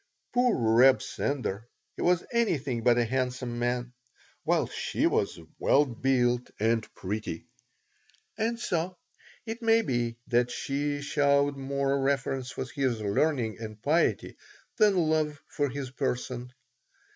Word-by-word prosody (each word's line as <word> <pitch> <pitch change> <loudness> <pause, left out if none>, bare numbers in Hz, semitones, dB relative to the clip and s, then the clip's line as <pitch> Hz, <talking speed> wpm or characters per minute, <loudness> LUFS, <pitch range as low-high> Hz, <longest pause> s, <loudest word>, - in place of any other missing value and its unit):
Poor 245 -1 +3
Reb 120 +3 +5
Sender! 120 -6 -3 0.3
He - - -7
was 175 -1 +3
anything 145 - 0
but 120 0 +4
a 120 - +3
handsome 125 0 -2
man, 120 0 -1 0.5
while - - +2
she - - -2
was - - +1 0.2
well 145 +2 +4
built 125 -1 +1
and 115 +1 +1
pretty. 95 -3 -4 0.9
And 225 +2 -1
so 180 -4 -2 0.5
it 225 +1 -5
may 225 0 +4
be 120 - -1
that 120 -1 +2
she 145 +2 -2
showed 140 0 +2
more 140 0 -1
reverence 135 -2 0
for 130 - -4
his 130 -3 -1
learning 110 +2 0
and 110 -1 -7
piety 155 +9 +1 0.4
than 210 -3 +4
love 155 -3 +1
for 145 -1 -1
his 135 -1 -5
person. 125 -2 -3
135 Hz, 130 wpm, -28 LUFS, 120-150 Hz, 0.9 s, Reb